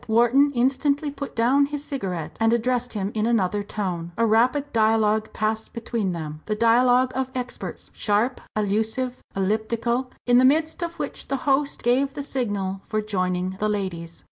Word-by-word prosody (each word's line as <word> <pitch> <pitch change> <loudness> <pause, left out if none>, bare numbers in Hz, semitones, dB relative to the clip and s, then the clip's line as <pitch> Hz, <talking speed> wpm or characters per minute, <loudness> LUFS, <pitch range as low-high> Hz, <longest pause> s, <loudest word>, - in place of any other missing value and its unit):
Wharton 240 +6 +4
instantly 280 +4 +1
put 280 0 -7
down 260 +5 +3
his 290 0 -5
cigarette 190 - -4
and 225 0 +3
addressed 245 +1 0
him 200 -2 -2
in 215 0 0
another 205 -3 +1
tone. 180 -5 -4
A 230 - +3
rapid 250 +6 +2
dialogue 220 -1 +2
passed 215 +1 -2
between 225 -4 -2
them, 155 -3 -6
the 215 - 0
dialogue 245 +3 +4
of 260 0 -1
experts, 250 -1 -5
sharp, 220 +5 0
allusive, 220 +5 -1
elliptical, 225 +5 0 0.2
in 245 0 +5
the - - +5
midst 310 +5 +3
of 340 0 -4
which - - -5
the 275 - -1
host 280 0 +1
gave 265 +3 +2
the 285 - -4
signal 205 -8 -2
for 215 - -2
joining 185 -3 -1
the 215 - +1
ladies. 175 -5 -4
230 Hz, 165 wpm, -24 LUFS, 205-255 Hz, 0.2 s, in